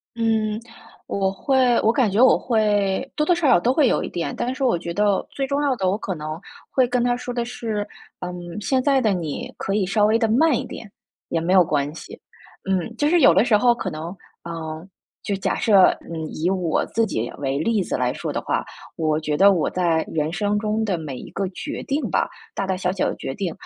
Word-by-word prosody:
嗯， 220 -2 0 0.5
我 195 -1 0
会 255 +3 +2
我 220 - +4
感 240 -4 +2
觉 225 +6 +4
我 260 - +6
会 205 -4 +1
多 300 - +1
多 350 +2 +3
少 335 -4 +1
少 240 -9 +6
都 245 +7 +1
会 290 -3 +4
有 - - +1
一 - - -4
点， 175 +8 -3
但 245 +1 -2
是 265 - -4
我 245 -8 +3
觉 170 0 -5
得 205 +1 +1
最 270 -1 -2
重 280 +1 0
要 280 -3 +2
的， 190 -5 0
我 200 - 0
可 195 - -4
能 155 -1 -6 0.3
会 255 -2 +2
跟 245 0 0
她 245 0 +1
说 245 0 -5
的 240 - -1
是， 220 -3 -4 0.3
嗯， 180 0 -5 0.3
“现 260 +2 +1
在 275 -2 +3
的 220 -4 +2
你 165 -6 -3
可 195 - -3
以 200 -3 +1
稍 205 +2 +3
微 220 +2 +3
地 225 - +2
慢 280 +6 +4
一 - - -2
点， 210 - -9 0.4
也 165 - 0
没 170 +2 -1
有 185 -1 +7
关 145 -2 -1
系。” - - -10 0.5
嗯， 190 +4 -1
就 295 +3 +1
是 345 -1 +4
有 170 - +7
的 195 - +4
时 230 -4 +4
候 240 +1 +4
可 215 -5 -4
能， 165 +2 -6 0.3
嗯， 160 +1 -6 0.4
就 200 - -1
假 190 - -1
设， 200 -5 +5 0.2
嗯， 160 -2 -6
以 165 +3 -2
我 180 -4 0
自 225 0 +2
己 115 +2 -3
为 135 -1 -1
例 210 +6 +1
子 - - -2
来 125 0 0
说 - - -4
的 - - -2
话， - - -1 0.3
我 155 -1 0
觉 150 -1 -2
得 200 +4 +6
我 175 -5 +1
在 170 -3 +1
人 155 0 -1
生 205 +2 0
中 220 +1 -1
的 195 -4 0
每 155 -5 -6
一 - - -10
个 195 -1 -2
决 295 - -6
定 290 +2 -1
吧， - - +1 0.2
大 195 - -3
大 190 -1 -1
小 180 -1 0
小 190 - 0
的 - - -4
决 135 - -5
定 185 0 -3
200 Hz, 255 characters per minute, -22 LUFS, 170-240 Hz, 0.5 s, 有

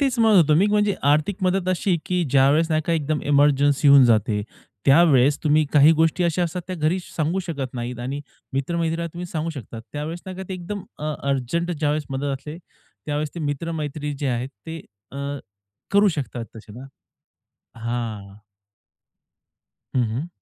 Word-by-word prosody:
तेच 270 -4 +1
म्हणत 220 -3 +5
होतो 155 -3 +5
मी 195 - +4
म्हणजे 210 -1 +2 0.2
आर्थिक 155 +6 +1
मदत 185 0 +1
अशी, 185 0 +1
की 180 -1 0
ज्यावेळेस 140 +4 +4
नाही 155 0 +2
का 170 - +1
एकदम 155 -1 0
इमर्जन्सी 145 0 +4
येऊन 140 -2 +8
जाते, 110 -2 +2 0.4
त्यावेळेस 140 -2 +5
तुम्ही 155 +1 +4
काही 150 +2 +7
गोष्टी 165 +2 +2
अशा 170 +1 +1
असतात 175 +1 -3
त्या 185 - -5
घरी 160 +3 +1
सांगू 165 +2 -2
शकत 135 -6 -4
नाहीत 120 0 -4
आणि 135 +4 -4 0.3
मित्र-मैत्रिणीला 165 +4 -1
तुम्ही 175 +1 -6
सांगू 165 -1 -3
शकतात. 115 -6 -8
त्यावेळेस 155 +4 -4
नाही 185 -1 -6
का 190 - -5
ते 190 - -3
एकदम 185 +2 -6 0.2
अ 150 +1 -2 0.2
अर्जंट 140 +7 -1
ज्यावेळेस 150 -2 -1
मदत 135 +1 -3
असते 150 +4 -9 0.5
त्यावेळेस 150 +1 -2
ते 170 - -5
मित्र-मैत्रीणी 150 0 -3
जे 145 - -2
आहेत 125 +1 -1 0.2
ते 165 0 -6 0.3
अं, 140 +1 -4 0.5
करू 200 +1 +5
शकतात 135 -7 -3
तसे 105 -1 -12
ना. 130 +4 -10 0.9
हां. 110 -4 -4 1.6
हं, 125 - +4
हं. 135 +9 -3
150 Hz, 165 wpm, -23 LUFS, 135-170 Hz, 1.6 s, येऊन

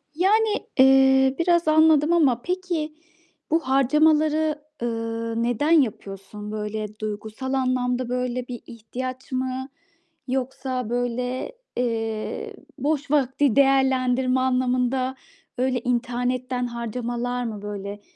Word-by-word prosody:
Yani, 420 +5 +2
eee, 265 0 +6
biraz 345 -1 +2
anladım 315 0 +5
ama 265 -8 +3
peki 350 -3 -2 0.6
bu 325 - +4
harcamaları, 300 +3 +2 0.2
ııı, 230 0 -2
neden 245 +7 0
yapıyorsun? 210 - 0
Böyle, 210 0 -4
duygusal 215 +5 -4
anlamda, 255 -1 0
böyle, 250 0 -2
bir 245 -2 -6
ihtiyaç 255 +3 -7
mı? 260 +1 -2 0.6
Yoksa, 255 -1 -2
böyle, 245 - -2 0.3
eee, 225 -3 -2 0.2
boş 285 0 -1
vakti 275 -3 +2
değerlendirme 265 -2 +3
anlamında, 255 0 +1 0.4
öyle 255 0 +1
internetten 250 +1 -1
harcamalar 240 +1 -3
mı, 215 -3 -5
böyle? 205 0 -6
255 Hz, 100 wpm, -24 LUFS, 235-275 Hz, 0.6 s, eee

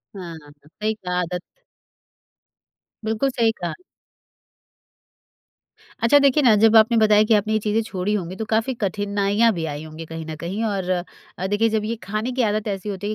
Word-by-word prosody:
हाँ। 175 -4 -7 0.3
सही 210 +8 -3
कहा, 180 -4 -3
आदत। 180 0 -3 1.6
बिल्कुल 220 +5 0
सही 230 -3 +2
कहा। 175 - -2 2.3
अच्छा, 260 +5 +6
देखिए 280 +1 +3
ना, 230 -4 +6
जब 220 +2 +4
आपने 225 +2 +5
बताया 215 -1 +5
कि 215 - +2
आपने 215 +1 0
ये 215 - +2
चीज़ें 215 +1 0
छोड़ी 195 -1 -2
होंगी, 185 -3 -3
तो 220 - -4
काफ़ी 225 +4 0
कठिनाइयाँ 205 +3 +1
भी 165 -3 -3
आई 145 +1 -6
होंगी 160 +1 -9
कहीं 165 0 -7
न 160 0 -6
कहीं 180 +8 -4
और 195 -4 -2 0.5
अ, 190 - -2
देखिए 205 +3 +2
जब 215 -1 0
ये 230 +2 -2
खाने 215 +4 -3
की 255 +1 -1
आदत 215 0 0
ऐसी 200 0 -3
होती 200 0 -4
है - - -1
210 Hz, 180 wpm, -22 LUFS, 185-220 Hz, 2.3 s, अच्छा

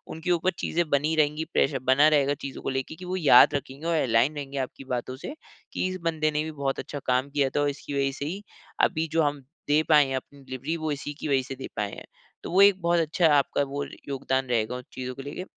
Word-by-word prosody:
उनके 160 +3 -2
ऊपर 175 +2 +2
चीज़ें 170 -1 -1
बनी 150 +3 +1
रहेंगी 155 +1 +1
प्रेशर 135 -1 +2
बना 145 +3 +6
रहेगा 145 -2 +3
चीज़ों 135 - -6
को - - -3
लेके 135 +4 -3
कि 180 - -10
वो 180 +1 -3
याद 150 -4 +7
रखेंगे 140 +2 -5
और 170 - +1
अलाइन 125 +4 +2
रहेंगे 140 -1 -6
आपकी 135 +1 -4
बातों 125 +1 -4
से 280 - -7 0.4
कि - - 0
इस 185 0 -4
बंदे 155 -2 0
ने 150 +1 0
भी 160 - -5
बहुत 140 -3 -2
अच्छा 145 +2 -6
काम 130 +2 +1
किया 140 -1 +1
था 145 - +2
और 145 - +2
इसकी 140 0 -7
वजह 135 0 +1
से 140 - -3
ही 190 +7 -5 0.4
अभी 160 +1 +2
जो 165 - +3
हम 145 -2 -1 0.2
दे 150 +1 +4
पाए 150 -2 +7
हैं 135 - -2
अपनी 140 +2 -7
डिलिवरी 130 +5 -4
वो 155 -1 -2
इसी 145 0 -4
की - - -4
वजह 135 -2 +2
से 135 - -5
दे 130 - -7
पाए 105 -2 -2
हैं। - - -9 0.4
तो - - -6
वो 190 +3 +5
एक 200 -2 +6
बहुत 170 0 +2
अच्छा 165 +2 +2
आपका 145 0 +2
वो 145 +1 -3 0.2
योगदान 135 -1 -1
रहेगा 120 0 0
उन 125 - -7
चीज़ों 130 0 -5
को 135 - -7
लेके। 145 +6 -6
145 Hz, 250 wpm, -26 LUFS, 135-160 Hz, 0.4 s, याद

